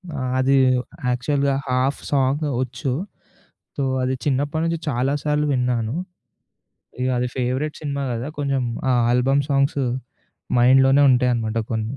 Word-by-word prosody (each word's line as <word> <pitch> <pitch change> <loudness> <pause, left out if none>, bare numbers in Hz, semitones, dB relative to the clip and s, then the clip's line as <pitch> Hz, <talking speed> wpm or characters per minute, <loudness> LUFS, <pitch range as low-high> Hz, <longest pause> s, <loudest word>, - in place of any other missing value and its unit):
ఆ! - - -4 0.2
అది 135 +1 +3 0.5
యాక్చువల్‌గా 140 +3 0
హాఫ్ 130 +2 0
సాంగ్ 140 +2 +1 0.2
ఒచ్చు 130 +2 -3 0.9
సో, 140 - -1 0.2
అది 130 +1 0
చిన్నప్పటి 145 +3 0
నుంచి 165 0 -1
చాలా 130 +1 0
సార్లు 150 0 0
విన్నాను. 125 -2 0 1.1
ఇగ 130 - 0
అది 125 - 0
ఫేవరేట్ 130 +4 -1
సినిమా 140 -1 -3
గదా 120 +4 -4
కొంచెం 140 -2 0 0.3
ఆ - - +4 0.2
ఆల్బమ్ 135 +3 +2
సాంగ్స్ 140 0 +2 0.8
మైండ్‌లోనే 135 +3 +5
ఉంటాయనమాట 120 -3 +1
కొన్ని. 110 +3 -2
130 Hz, 125 wpm, -22 LUFS, 125-140 Hz, 1.1 s, మైండ్‌లోనే